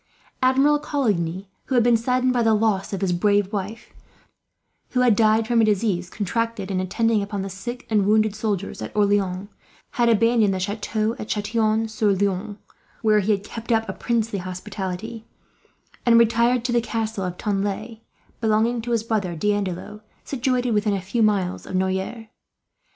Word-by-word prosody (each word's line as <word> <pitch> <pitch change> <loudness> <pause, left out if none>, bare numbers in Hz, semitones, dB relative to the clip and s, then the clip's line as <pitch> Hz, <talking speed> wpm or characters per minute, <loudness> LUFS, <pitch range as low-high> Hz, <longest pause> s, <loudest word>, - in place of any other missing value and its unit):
Admiral 270 +3 +4
Coligny, 200 - -1 0.2
who 265 - -2
had 240 - +5
been 240 0 +4
saddened 250 +2 +1
by 245 - +1
the 225 -1 +4
loss 210 -3 0
of 195 - -3
his 185 -2 +1
brave 205 +2 +1
wife, 205 +3 -5 1.0
who 250 - +2
had 245 -4 +4
died 220 +1 +3
from 235 -1 +3
a - - +4
disease 200 -4 +1
contracted 215 0 -2
in 185 - 0
attending 220 +4 +1
upon 200 -1 -3
the 195 - -5
sick 240 +7 -7
and 210 -3 +2
wounded 215 0 +3
soldiers 210 -3 -3
at - - -5
Orleans, 200 -2 +1 0.4
had 240 -1 +2
abandoned 225 -2 +3
the - - -2
chateau 215 +3 -2
at 215 - -6
Chatillon 220 +1 0
sur 215 -2 +1
Loing, 200 +1 -1 0.5
where 215 -1 +4
he 210 +2 +1
had 200 -1 0
kept 230 +3 -7
up 225 -1 +2
a 190 - -3
princely 225 -3 -1
hospitality; 190 +4 -6 0.8
and 235 -1 +5
retired 235 +1 +3
to 245 - 0
the 240 0 +3
castle 220 -3 -3
of 180 -1 -4
Tanlay, 210 +2 -3 0.4
belonging 225 +1 +1
to 240 +1 -3
his 225 -2 +1
brother 205 -6 -1
D'Andelot, 205 +2 -2 0.2
situated 250 -2 -1
within 210 -1 +1
a - - -1
few 210 +6 -2
miles 200 -4 +1
of - - -5
Noyers. 190 +5 -2
215 Hz, 170 wpm, -23 LUFS, 195-230 Hz, 1.0 s, had